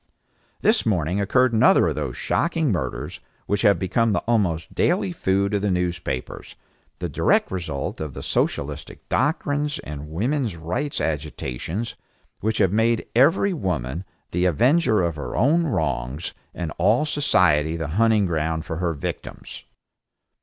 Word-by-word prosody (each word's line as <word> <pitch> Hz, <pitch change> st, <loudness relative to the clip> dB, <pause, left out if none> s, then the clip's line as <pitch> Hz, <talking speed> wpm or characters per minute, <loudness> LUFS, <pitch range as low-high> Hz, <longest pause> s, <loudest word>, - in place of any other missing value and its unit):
This 220 Hz, +1 st, +3 dB
morning 90 Hz, -2 st, 0 dB
occurred 125 Hz, +5 st, +3 dB
another 110 Hz, -, +5 dB
of -, -, -1 dB
those -, -, -4 dB
shocking 165 Hz, -5 st, 0 dB
murders 90 Hz, -, -3 dB, 0.3 s
which 100 Hz, 0 st, 0 dB
have 100 Hz, -3 st, +5 dB
become 110 Hz, +3 st, +1 dB
the -, -, 0 dB
almost 90 Hz, -9 st, 0 dB
daily 185 Hz, +1 st, +1 dB
food 100 Hz, -, 0 dB
of 100 Hz, -, +1 dB
the 105 Hz, -, 0 dB
newspapers, 85 Hz, -7 st, -3 dB, 0.4 s
the -, -, -3 dB
direct -, -, +2 dB
result 85 Hz, -8 st, -4 dB
of 75 Hz, -4 st, -5 dB
the -, -, -6 dB
socialistic 70 Hz, +1 st, -2 dB
doctrines 145 Hz, 0 st, 0 dB
and 75 Hz, 0 st, -7 dB
woman's 115 Hz, -, -1 dB
rights 90 Hz, -, -3 dB
agitations, 80 Hz, -, -3 dB, 0.4 s
which 110 Hz, +2 st, -1 dB
have 95 Hz, -4 st, +3 dB
made 115 Hz, +1 st, +2 dB
every 165 Hz, +10 st, +4 dB
woman 85 Hz, -, -2 dB, 0.3 s
the 90 Hz, +2 st, +1 dB
avenger 120 Hz, -, +3 dB
of 85 Hz, -2 st, -1 dB
her 75 Hz, -, -5 dB
own 160 Hz, +8 st, +3 dB
wrongs, 70 Hz, -, -2 dB, 0.2 s
and 85 Hz, -3 st, -4 dB
all 110 Hz, -, +3 dB
society 90 Hz, -, +2 dB
the 80 Hz, -2 st, -4 dB
hunting 110 Hz, -3 st, +4 dB
ground 80 Hz, -1 st, -1 dB
for 80 Hz, -, -4 dB
her 85 Hz, -2 st, -1 dB
victims. 70 Hz, -, -7 dB
95 Hz, 145 wpm, -23 LUFS, 80-120 Hz, 0.4 s, another